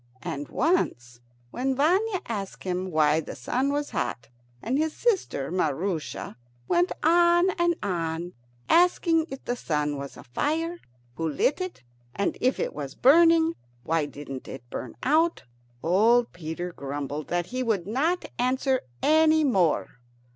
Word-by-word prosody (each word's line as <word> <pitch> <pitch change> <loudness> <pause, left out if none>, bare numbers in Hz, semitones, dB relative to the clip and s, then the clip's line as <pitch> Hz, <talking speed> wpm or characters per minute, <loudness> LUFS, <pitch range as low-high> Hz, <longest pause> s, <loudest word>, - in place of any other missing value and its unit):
And 145 +1 -4
once, 125 - 0 0.3
when 265 +2 -1
Vanya 370 +8 +2
asked 200 -4 -5
him 185 0 -2
why 155 -2 +3
the 160 - -6
sun 255 - -1
was 290 0 -2
hot, 115 -1 -3 0.3
and 250 - -1
his 315 0 0
sister 370 - 0
Maroosia 160 - -2 0.3
went 350 +1 +2
on 345 +3 +5
and 345 -1 +1
on 170 -2 -2 0.3
asking 335 -2 +3
if 270 - -8
the 245 - -1
sun 150 -9 -1
was 140 0 -7
a - - -11
fire, 325 - -2 0.4
who 165 -1 -1
lit 255 - +1
it? 370 - -6 0.3
and 200 - 0
if 255 +1 +2
it - - -2
was 140 -2 -6
burning, 330 +4 +5 0.3
why 160 +1 0
didn't 140 -2 -8
it 125 -2 -9
burn 125 - -6
out? 320 +5 +2 0.4
old 230 +7 +3
Peter 175 +1 -5
grumbled 145 +1 -5
that 175 0 -1
he 255 - -1
would 215 -8 0
not 305 - 0
answer 260 +1 +1 0.2
any 315 0 +5
more. 185 - +1
230 Hz, 145 wpm, -26 LUFS, -, 0.4 s, on